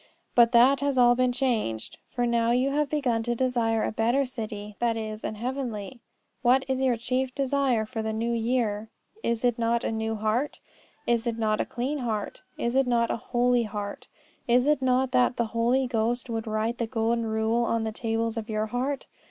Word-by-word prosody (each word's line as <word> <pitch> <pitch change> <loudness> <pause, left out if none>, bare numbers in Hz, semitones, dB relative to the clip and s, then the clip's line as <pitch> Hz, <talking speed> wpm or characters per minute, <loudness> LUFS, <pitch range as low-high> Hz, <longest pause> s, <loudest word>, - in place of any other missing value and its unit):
But 235 -1 +6
that 255 +3 +6
has 280 -2 0
all 245 -1 +6
been 250 0 +2
changed. 235 - -1
For 245 -1 -1
now 235 -1 +2
you 250 +3 +2
have 295 0 0
begun 260 -7 0
to 240 +1 -1
desire 235 -3 +1
a - - -1
better 235 +5 +1
city, 215 -4 -6
that 235 -1 +1
is, 215 -1 -5
an - - -3
heavenly. 240 -1 -4 0.4
What 255 +2 +4
is 265 0 -1
your 255 -3 +2
chief 255 +2 -2
desire 270 -4 +1
for 225 0 -4
this 220 0 -2
New 230 +2 -1
Year? 225 -2 0 0.3
Is 235 - -1
it 245 -1 +1
not 235 0 +1
a - - -1
new 220 0 -2
heart? 220 +6 -1 0.5
Is 235 0 +1
it 230 -1 -1
not 215 -1 +1
a - - -1
clean 265 +5 -2
heart? 220 -5 -3 0.2
Is 235 +1 -1
it 270 -1 +3
not 235 -1 +2
a - - 0 0.2
holy 245 0 +3
heart? 205 -2 -5 0.4
Is 245 +1 +4
it 295 -1 +2
not 260 0 +2
that 250 0 +3
the 235 - +1
Holy 240 +3 +2
Ghost 240 0 -1
would 225 0 -3
write 220 +2 -1
the 230 - -1
golden 230 0 0
rule 220 +2 +1
on 230 -1 0
the 220 - -2
tables 225 +1 -2
of 225 0 -4
your 215 0 0
heart? 255 +5 -2
235 Hz, 200 wpm, -27 LUFS, 225-255 Hz, 0.5 s, But